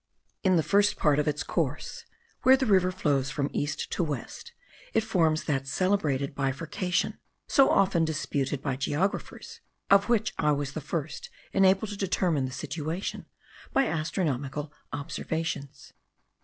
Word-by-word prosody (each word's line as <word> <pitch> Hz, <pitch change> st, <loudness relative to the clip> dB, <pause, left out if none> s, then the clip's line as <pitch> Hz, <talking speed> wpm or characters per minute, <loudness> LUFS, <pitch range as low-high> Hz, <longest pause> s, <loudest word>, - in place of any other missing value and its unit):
In 185 Hz, -2 st, +4 dB
the 160 Hz, -, +3 dB
first 205 Hz, +3 st, +3 dB
part 150 Hz, -2 st, +3 dB
of 150 Hz, -, 0 dB
its 150 Hz, +3 st, 0 dB
course, -, -, -3 dB, 0.4 s
where 260 Hz, +1 st, +7 dB
the 265 Hz, -, 0 dB
river 185 Hz, -3 st, +4 dB
flows 145 Hz, -7 st, 0 dB
from 140 Hz, 0 st, -2 dB
east 145 Hz, 0 st, -2 dB
to -, -, 0 dB
west, 145 Hz, -7 st, -5 dB, 0.4 s
it 225 Hz, -, +4 dB
forms 165 Hz, -7 st, +2 dB
that 135 Hz, -3 st, -1 dB
celebrated 145 Hz, -5 st, 0 dB
bifurcation 150 Hz, +7 st, -1 dB, 0.3 s
so 275 Hz, -2 st, +5 dB
often 185 Hz, -4 st, +3 dB
disputed 145 Hz, -3 st, -1 dB
by 135 Hz, -3 st, -1 dB
geographers, 155 Hz, +8 st, -2 dB, 0.3 s
of 200 Hz, +3 st, +5 dB
which 220 Hz, -2 st, +2 dB
I 150 Hz, 0 st, +3 dB
was 145 Hz, -1 st, -2 dB
the 155 Hz, -, -5 dB
first 155 Hz, 0 st, -4 dB, 0.2 s
enabled 195 Hz, +2 st, +3 dB
to 205 Hz, -, -6 dB
determine 180 Hz, -7 st, +1 dB
the 130 Hz, -, -4 dB
situation 155 Hz, +6 st, -4 dB, 0.5 s
by 270 Hz, -, +4 dB
astronomical 150 Hz, -, -2 dB, 0.2 s
observations. 145 Hz, -1 st, -4 dB
155 Hz, 140 wpm, -28 LUFS, 140-190 Hz, 0.5 s, where